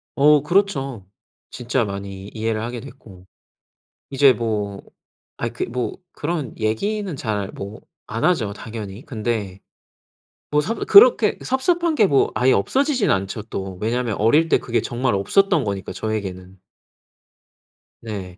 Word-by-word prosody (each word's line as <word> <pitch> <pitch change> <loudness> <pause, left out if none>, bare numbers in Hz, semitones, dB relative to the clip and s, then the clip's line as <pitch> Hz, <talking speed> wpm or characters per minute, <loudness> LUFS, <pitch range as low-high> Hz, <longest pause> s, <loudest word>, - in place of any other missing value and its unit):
어 150 +1 +5
그렇죠. 140 - 0 0.4
진짜 125 0 -1
많이 100 -1 -6
이해를 110 -1 -2
하게 120 +2 -4
됐고 110 -9 -14 0.9
이제 135 0 +5
뭐 105 -4 -3 0.6
아이 - - -3
그 - - -3
뭐 125 0 -3 0.2
그런 150 -5 -4
얘기는 190 - -1
잘 105 -6 -2
뭐 100 +3 -8 0.3
안 110 +1 -4
하죠 125 - +2
당연히. 105 0 -8
근데 110 -6 -3 0.9
뭐 150 0 +3
섭 225 +9 -2
그렇게 475 +5 +7
섭섭한 335 +5 +1
게 220 - +5
뭐 140 -6 +3
아예 130 +1 +3
없어지지는 260 - +2
않죠 95 +3 -3
또. 95 -4 -6
왜냐면 115 0 -1
어릴 145 +10 +4
때 - - +5
그게 120 -1 -1
정말 120 0 -1
없었던 155 - +2
거니까 100 -2 -4
저에게는. 95 -4 -5 1.4
네. 95 -5 -7
115 Hz, 255 characters per minute, -21 LUFS, 100-150 Hz, 1.4 s, 그렇게